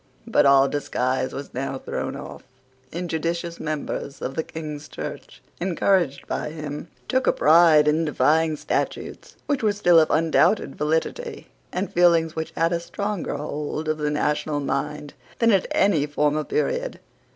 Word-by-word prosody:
But - - +3
all 140 0 +6
disguise 130 -2 -1
was 140 - -7
now 135 +1 -3
thrown - - -4
off. - - -8 0.5
Injudicious 170 0 -3
members 150 -2 -4
of 135 - -4
the 160 - -1
King's 150 -2 -7
Church, - - -8 0.2
encouraged 175 -5 +1
by - - -3
him, 150 0 -6 0.2
took 260 0 +1
a - - +6
pride 155 -1 +5
in 155 +2 +2
defying 155 +1 +2
statutes - - -3
which 285 -3 0
were 215 -2 +2
still 175 -5 +5
of 155 - +3
undoubted 165 +1 +2
validity, 160 - -2 0.2
and 190 +2 -3
feelings 170 -2 +4
which 160 0 -3
had 165 +1 +2
a 170 - 0
stronger 200 +2 -3
hold 150 +1 -4
of 155 0 -1
the 150 0 0
national 150 0 0
mind 145 +1 -3 0.2
than 230 -1 +4
at 195 -3 +2
any 165 -7 +2
former 150 +1 +1
period. - - -2
155 Hz, 150 wpm, -24 LUFS, 150-175 Hz, 0.5 s, all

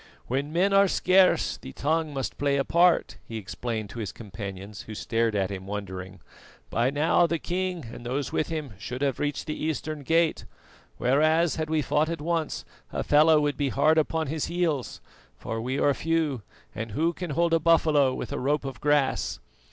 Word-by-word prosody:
"When 140 +4 -2
men 185 +4 +2
are 195 0 +6
scarce 185 0 +3
the 65 - -10
tongue 155 +2 0
must 135 -2 -4
play 140 0 +2
a 135 - +2
part," 175 0 +3
he 115 - -7
explained 110 +1 -4
to 120 - -7
his 105 -4 -3
companions, 100 -1 -8
who 110 - -9
stared 115 0 0
at 95 -1 0
him 95 -1 -6
wondering. 95 -2 -6 0.5
"By 120 +3 +2
now 155 +4 +3
the 170 - 0
king 180 -2 -3
and - - -9
those 130 +4 -2
with - - 0
him 155 -7 -4
should 125 +6 -5
have 135 -3 0
reached 145 0 -2
the 155 - -3
eastern 155 0 -2
gate; 165 +3 +1 0.5
whereas, 155 +5 +3
had 155 -1 -2
we 155 -1 +1
fought 150 +4 +1
at 165 -1 -3
once, 165 0 -2 0.3
Hafela 155 +1 +4
would 145 -2 0
be 145 -2 0
hard 155 +4 +3
upon 160 +1 0
his 155 +1 -2
heels, 170 -7 -1 0.4
for 115 0 -4
we 130 +3 -2
are 145 - +3
few, 160 -5 0 0.3
and 115 -1 -5
who 165 +7 +1
can 180 0 -6
hold 170 0 +2
a 165 - +5
buffalo 155 -4 +4
with - - -5
a 145 - -2
rope 145 +2 0
of 135 -3 -6
grass? 145 -2 +1
145 Hz, 190 wpm, -26 LUFS, 120-160 Hz, 0.5 s, are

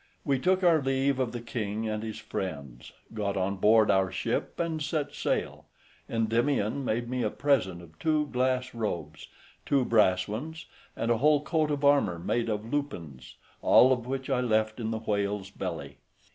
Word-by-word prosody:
We 135 -2 +1
took 185 +5 +2
our 165 -3 +5
leave 135 0 +1
of 125 -3 0
the 120 - -5
king 110 -2 -3
and 110 0 -2
his 110 -1 -5
friends, 70 -9 -6 0.2
got 100 -2 -2
on 95 +1 -1
board 110 +2 +5
our 95 -1 +2
ship, - - -2
and 165 -2 -1
set 150 0 -2
sail. - - -2 0.4
Endymion 115 +2 0
made 120 -1 -1
me 125 +1 -2
a 110 - +1
present 105 -11 0
of 80 -1 -17
two 155 -1 +1
glass 130 0 0
robes, 85 -10 -4 0.4
two 135 -3 +2
brass 95 -6 +3
ones, 155 +10 -6 0.3
and 115 - -1
a 115 - +2
whole 150 +1 +4
coat 155 -1 +1
of 145 -1 -1
armour 140 -12 +4
made 115 +7 -1
of 105 0 -2
lupines, 80 - -4 0.3
all 130 +1 +6
which 130 +2 -5
I 130 -2 +1
left 110 -1 +1
in 110 -2 -2
the 110 - -2
whale's 100 -2 -2
belly. - - -5
115 Hz, 175 wpm, -28 LUFS, 100-135 Hz, 0.4 s, all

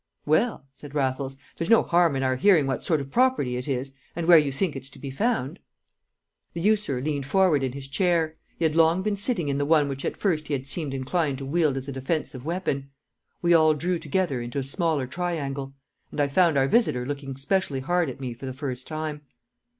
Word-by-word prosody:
"Well," 155 - +1
said 145 +1 -12
Raffles, 135 -1 -1 0.2
"there's 165 - -3
no 230 - +6
harm 170 -4 +3
in 135 - -1
our 130 0 +1
hearing 165 0 +4
what 135 -2 -1
sort 160 -4 +1
of 135 0 -8
property 250 - +2
it 125 +2 -4
is, 135 0 -2 0.2
and 170 0 -2
where 175 0 +8
you 145 -2 0
think 150 +4 -1
it's 135 0 -7
to - - -15
be 140 - -6
found." 205 - -1 0.9
The 170 - -4
usurer 200 -10 +1
leant 145 -2 -2
forward 180 -2 +3
in 130 -2 -2
his 135 0 -7
chair; 165 +1 +1 0.2
he 165 - 0
had 155 - +2
long 165 +3 +4
been 210 0 0
sitting 200 - -1
in 140 0 0
the - - +1
one 150 0 +3
which 135 -1 -5
at - - -3
first 160 -7 0
he 150 - -2
had 135 -1 -2
seemed 140 -1 -4
inclined 140 +2 -1
to 135 - -6
wield 150 -1 +1
as 135 +1 -5
a - - -3
defensive 135 -1 -3
weapon. 155 -5 -2 0.5
We 175 0 +4
all 155 -2 +5
drew 175 +3 -1
together 160 -4 -1
into 120 +3 -5
a 140 - 0
smaller 155 0 0
triangle. 140 -3 -3 0.3
And - - -7
I 145 - +3
found 165 0 +3
our 135 0 +3
visitor 135 - +2
looking 140 -1 -5
specially 140 -2 0
hard 175 +2 +1
at 130 - -8
me 130 -3 -4
for 125 +3 -8
the 130 - -4
first 130 -2 -5
time. 155 -1 -4
145 Hz, 220 wpm, -25 LUFS, 135-170 Hz, 0.9 s, where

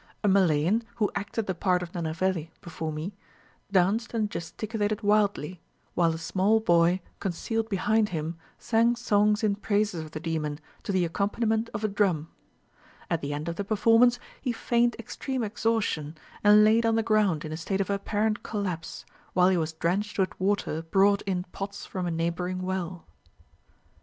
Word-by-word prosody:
A - - +3
Malayan, 190 +1 +3
who 215 -3 0
acted 205 +2 -3
the 190 - -1
part 180 0 +1
of 170 - -8
Nenaveli 170 0 -1
before 160 -2 -5
me, 155 +6 -5 0.6
danced 205 +6 +2
and 215 -2 0
gesticulated 210 +4 -3
wildly, 205 -5 +1 0.3
while 170 -2 +3
a - - -4
small 190 +6 +2
boy, 175 -2 +3 0.2
concealed 225 +5 -2
behind 215 +2 +2
him, 160 -1 -3 0.2
sang 230 +1 +2
songs 210 -2 +2
in 210 -2 +3
praises 205 -4 0
of 155 - -9
the 155 - -6
demon, 155 -3 -3 0.2
to - - -3
the 185 -2 +2
accompaniment 220 +5 0
of 210 - -5
a - - +3
drum. 190 -6 0 0.8
At - - +1
the 140 - -3
end 145 +2 -4
of 170 0 -3
the 200 - -1
performance, 225 +4 +4 0.2
he 255 - -1
feigned 235 0 +1
extreme 255 +2 -4
exhaustion, 205 -8 -1 0.3
and 210 0 +7
laid 220 +2 +5
on 225 -1 +2
the 225 - +2
ground 210 -8 +2
in 155 - -6
a - - -3
state 190 +4 -2
of 195 0 0
apparent 210 +2 0
collapse, 185 -6 -4 0.3
while 180 0 +5
he 185 - +2
was 160 -1 -1
drenched 185 +6 -1
with 190 -2 +1
water 190 -4 0
brought 195 +4 +3
in 180 -2 0
pots 200 0 -6
from 185 -2 -4
a - - 0
neighbouring 175 +2 -2
well. 185 -2 -3
195 Hz, 170 wpm, -27 LUFS, 170-215 Hz, 0.8 s, and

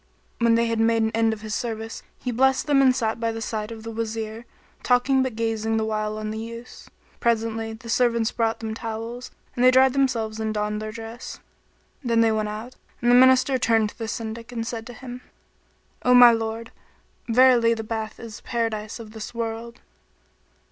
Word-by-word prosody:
When 235 -1 +4
they 230 0 +2
had 230 -1 -1
made 225 0 +3
an 220 - 0
end 225 0 +2
of 220 -1 -5
his 215 -1 -5
service, 225 -1 -4 0.2
he 250 - -4
blessed 265 +2 +2
them 285 -2 +4
and 260 -2 +5
sat 225 -2 -1
by 230 0 0
the 225 - -5
side 220 -1 -4
of 220 -1 -8
the 225 - -6
Wazir, 225 0 -4 0.4
talking 260 +2 +3
but 260 -3 -2
gazing 225 -1 -1
the 220 - 0
while 215 0 -2
on 215 0 -4
the 220 - -4
youths. 230 +2 -9 0.3
Presently, 225 -1 0
the 225 +2 -12
servants 235 -1 +2
brought 225 -1 -1
them 220 -1 -3
towels, 230 +2 -6 0.3
and 245 - 0
they 255 - +8
dried 260 0 +5
themselves 235 -5 0
and 220 0 -2
donned 210 0 -2
their 215 0 -5
dress. 225 +2 -8 0.6
Then 230 -2 +2
they 225 -1 +4
went 215 -1 -1
out, 220 +4 -7 0.3
and 240 0 +2
the - - +7
Minister 260 +1 +5
turned 225 -2 +2
to - - -23
the 225 - -3
Syndic 230 +1 -5
and 230 -2 -3
said 230 -1 -5
to 245 - -9
him, 250 +1 -9 0.8
"O 250 0 +4
my 245 -1 +10
lord! 225 0 -3 0.6
verily 235 -1 +5
the 220 - -5
bath 220 0 -5
is 230 -2 -8
the - - -19
Paradise[FN#21] 225 -3 -2
of 215 -2 -11
this 220 +1 -8
world." 230 0 -5
230 Hz, 200 wpm, -24 LUFS, 220-240 Hz, 0.8 s, my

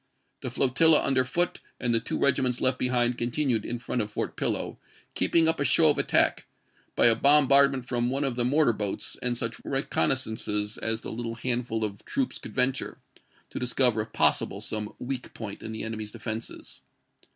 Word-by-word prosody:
The - - -4
flotilla 150 +5 +4
under 130 -2 +2
Foote 175 +8 -1 0.2
and 120 -1 0
the 115 - +4
two - - -4
regiments 130 -3 +1
left 130 0 +1
behind 125 -1 0
continued 120 -2 0
in 120 - -4
front 120 0 -3
of 105 - -4
Fort 105 - -4
Pillow, - - -2 0.3
keeping 165 -1 +3
up 160 -2 +1
a - - +1
show 155 +1 +4
of - - -2
attack, - - +2 0.5
by - - +4
a 115 - +7
bom 140 +3 +5
bardment 140 -2 +4
from 120 -1 -1
one 135 +3 -1
of 135 -3 -1
the 120 - 0
mortar 140 0 +3
boats 105 -2 -3
and 120 -1 0
such 115 0 -2
reconnaissances 110 -6 0
as 110 0 -2
the - - -7
little 115 0 -4
handful 120 -1 -2
of 100 -2 -4
troops 270 -2 -2
could - - -10
venture, 130 0 0 0.5
to - - -5
discover 125 -2 +1
if 110 - -8
possible - - +1
some 105 -1 -3
weak 125 0 -6
point 105 -3 -7
in 110 - -6
the 110 - -5
enemy's 110 -1 -5
defenses. 110 +1 -6
125 Hz, 185 wpm, -27 LUFS, 115-135 Hz, 0.5 s, a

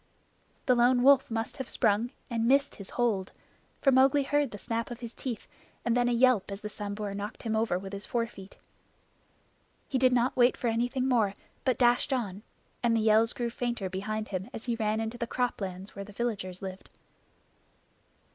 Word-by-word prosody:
The 255 - +5
Lone 245 +1 +4
Wolf 275 0 +6
must 225 +1 -3
have 265 - -5
sprung 220 +1 +2 0.2
and 230 -1 0
missed 275 +2 +3
his 200 -1 -7
hold, 215 -6 0 0.5
for 275 - +6
Mowgli 270 +2 +5
heard 290 0 +1
the 205 - -8
snap 230 +2 -3
of 240 -1 -7
his 235 -1 -6
teeth 240 -6 -5 0.4
and 235 -1 +2
then 245 0 +3
a - - +1
yelp 240 -4 +4
as 200 +1 -6
the 210 - -5
Sambhur 205 -1 -5
knocked 205 +1 -6
him 220 -2 -1
over 220 -5 +1
with 195 +1 -7
his 200 0 -6
forefoot. 230 -5 -4 1.3
He 265 - 0
did 255 0 +5
not 245 +1 +2
wait 245 0 +4
for 240 - 0
anything 245 +3 0
more, 220 -6 +2 0.3
but 255 -3 +1
dashed 245 +2 +3
on; 210 -7 -2 0.4
and 235 -1 +3
the - - +2
yells 220 +1 +4
grew 240 -4 -3
fainter 235 -6 -3
behind 215 +3 -3
him 190 +3 -4
as 225 - -7
he 240 - 0
ran 220 -1 0
into 225 +2 -4
the 235 - -2
croplands 195 -6 -2
where 200 - -6
the 205 +1 -12
villagers 200 -5 -3
lived. 190 0 -7
230 Hz, 190 wpm, -29 LUFS, 205-245 Hz, 1.3 s, Wolf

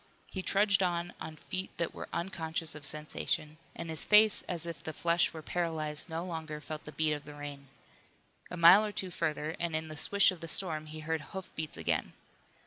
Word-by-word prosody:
He 190 - -3
trudged 200 +2 +4
on 175 -1 0
on 160 - -6
feet 185 +4 -4
that 170 -1 -1
were - - -7
unconscious 165 -2 -3
of 150 -2 -1
sensation, 150 0 -2 0.2
and 170 - -5
his 160 - -2
face 215 0 +6
as 170 -2 0
if 170 -4 -6
the 160 - -4
flesh 170 +2 +2
were 160 -1 -8
paralyzed 160 -2 -2
no 165 +2 -3
longer 160 -3 -5
felt 155 0 -6
the 150 - -7
beat 155 0 +1
of 145 -1 -4
the 145 0 -10
rain. 145 -1 -7 0.8
A 180 - -5
mile 175 +5 +9
or 210 - -2
two 190 -2 -3
further 155 -1 -1
and 170 -2 -1
in 160 0 -2
the 155 - -6
swish 200 +7 +4
of 185 - -8
the 165 - -7
storm 160 -4 +1
he 155 +1 -8
heard 160 0 -1
hoofbeats 160 -3 -6
again. - - -1
160 Hz, 205 wpm, -32 LUFS, 155-175 Hz, 0.8 s, mile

